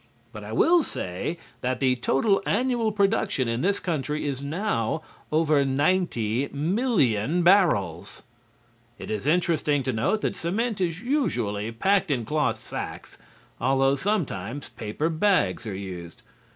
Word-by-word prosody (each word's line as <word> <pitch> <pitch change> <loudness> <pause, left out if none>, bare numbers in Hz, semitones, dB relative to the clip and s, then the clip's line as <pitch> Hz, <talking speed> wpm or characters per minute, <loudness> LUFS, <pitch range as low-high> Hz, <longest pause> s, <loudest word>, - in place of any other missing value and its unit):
But 105 -1 -8
I 105 - -8
will 335 - +4
say 95 - -4 0.2
that 125 0 -1
the 130 -2 +3
total 165 - +2
annual 240 -1 +1
production 200 - +1
in 115 +1 -1
this 200 +3 +1
country 150 -3 -2
is 140 -2 -2
now 155 - -1 0.3
over 155 -2 +3
90,000,000 145 - +1
barrels. 100 - +2 0.7
It - - -7
is 110 +5 -3
interesting 155 -4 +2
to 130 - -1
note 140 - 0
that - - -1
cement 205 +5 -2
is 170 0 -1
usually 120 - -1
packed 190 - +1
in 125 -6 0
cloth 150 +5 0
sacks, - - -7 0.4
although 135 +2 +3
sometimes 140 - -2
paper 110 +9 -3
bags 160 - +1
are 100 - -4
used. 95 +3 -8
145 Hz, 130 wpm, -25 LUFS, 115-190 Hz, 0.7 s, will